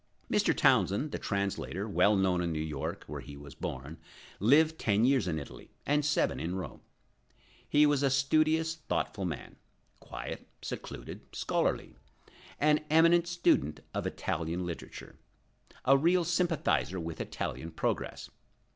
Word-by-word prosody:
Mr. - - +2
Townsend, 135 +10 +3
the - - -3
translator, 100 0 -2
well 105 0 +4
known 95 -2 +2
in 85 -1 -1
New 80 - -2
York, 75 -3 -4
where 75 -1 -6
he 70 +2 -10
was 70 0 -11
born, 70 +5 -6 0.4
lived 155 - +4
ten 110 +1 +2
years 130 -7 +3
in 80 -3 -1
Italy, 70 - -9 0.2
and 145 +1 +2
seven 150 +1 +1
in 85 +3 -3
Rome. 95 - -6 0.9
He 150 +1 +5
was 145 -2 +3
a 140 - +3
studious, 155 +4 +2 0.2
thoughtful 100 -2 -1
man; 80 -5 -6 0.4
quiet, - - -7 0.2
secluded, - - -7
scholarly; - - -1 0.6
an 150 +1 +3
eminent 170 +2 +5
student 75 - +1
of - - -2
Italian 85 +3 -2
literature; 85 -2 -8 0.7
a 135 - +6
real 170 +5 +3
sympathizer 165 - +1
with 85 -1 -5
Italian 80 - -4
progress. - - -3
105 Hz, 140 wpm, -31 LUFS, -, 0.9 s, a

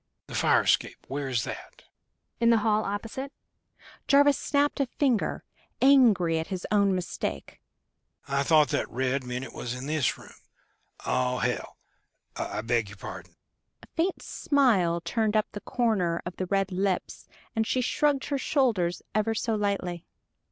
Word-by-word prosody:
"The - - -11
fire - - +3
escape - - +1
where 140 +1 -3
is 125 -4 0
that?" - - -8 0.6
"In 235 0 +4
the 230 - +6
hall 215 0 +2
opposite." 225 +7 -4 0.8
Jarvis 285 0 +5
snapped 290 0 0
a 275 - +1
finger, 250 -4 0 0.4
angry 220 -12 +5
at 160 - -4
his 185 -2 -5
own 200 -2 +3
mistake. 180 - -4 0.7
"I 140 0 +1
thought 150 +1 +4
that - - -1
red 130 +2 -1
meant 125 +1 -4
it - - -11
was 120 +1 -4
in 125 +1 -6
this 150 -3 0
room. - - -14 0.7
Oh, 125 0 +1
hell!... - - -2 0.6
I - - -3
beg 115 -2 0
your 100 - -12
pardon!" - - -9 0.5
A - - -14
faint 350 +3 0
smile 210 - +2
turned 220 +2 0
up 215 - 0
the 205 - -7
corner 195 -9 0
of 175 - -6
the 185 - -3
red 195 0 0
lips, 190 0 -2 0.3
and 220 0 +1
she 255 - +1
shrugged 280 +2 +1
her 280 -2 0
shoulders 230 - +1
ever 215 +2 +1
so 225 +1 -1
lightly. 200 -5 -1
200 Hz, 160 wpm, -27 LUFS, 155-240 Hz, 0.8 s, the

